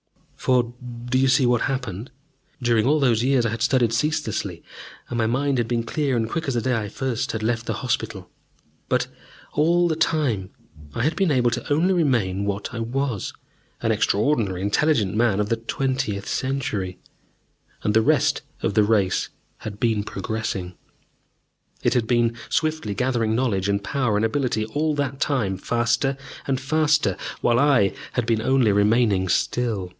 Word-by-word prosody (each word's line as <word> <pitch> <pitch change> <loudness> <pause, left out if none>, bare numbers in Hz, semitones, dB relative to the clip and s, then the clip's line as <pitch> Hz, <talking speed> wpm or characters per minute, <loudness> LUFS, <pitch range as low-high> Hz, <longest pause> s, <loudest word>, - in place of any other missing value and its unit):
For 125 -2 +1 0.3
do 130 +1 +1
you 135 - +3
see 130 0 +4
what 120 -1 +2
happened? 125 -5 -3 0.5
During 120 -2 +2
all 150 +2 +3
those 120 -5 +3
years 130 -2 +3
I 115 - 0
had 115 0 -4
studied 125 -3 +2
ceaselessly, 150 +7 -1 0.4
and 120 - -5
my 115 -1 +1
mind 135 +2 +1
had 120 - 0
been 120 0 0
clear 135 +1 -1
and 115 -1 0
quick 160 +6 -3
as 135 - -1
the 120 - +1
day 125 +2 +1
I 105 -2 -2
first 130 +1 -2
had 110 -1 -3
left 115 0 -1
the - - 0
hospital. 125 - -2 0.6
But - - +2 0.5
all 170 +4 +3
that 160 -1 -1
time 130 - +1 0.5
I - - -1
had 155 +5 +1
been 195 -3 +2
able 125 -4 +3 0.2
only 160 +6 +3
to - - +3
remain 115 - +1
what 100 +2 -3
I 120 - -4
was 120 -2 -2 0.5
an - - +2
extraordinarily 105 -5 +1
intelligent 105 -1 +2
man 110 -2 +2
of 105 0 0
the 115 - +1
twentieth 130 -3 -2
century. 110 -9 -2 0.9
And 105 - +1
the 110 - +5
rest - - +2 0.2
of 100 - 0
the 110 - +4
race 105 -3 +1 0.3
had 105 -1 -8
been 115 -4 +1
progressing! 95 -3 -4 1.1
It - - +3
had 120 -3 +1
been 120 -1 +2
swiftly 155 -10 -1
gathering 115 -2 0
knowledge 105 -6 0
and 100 0 0
power 125 -3 0
and 110 - +2
ability 120 -2 0
all 150 +7 -1
that 140 -2 -2
time, 125 -11 0
faster 120 +5 0 0.3
and 135 -2 0
faster, 150 - +2 0.3
while 120 0 +3
I 135 -9 +4 0.2
had 125 - 0
been 115 -1 +1
only 130 -3 +3
remaining 105 -1 +3
still. 105 -1 0
120 Hz, 170 wpm, -23 LUFS, 110-135 Hz, 1.1 s, the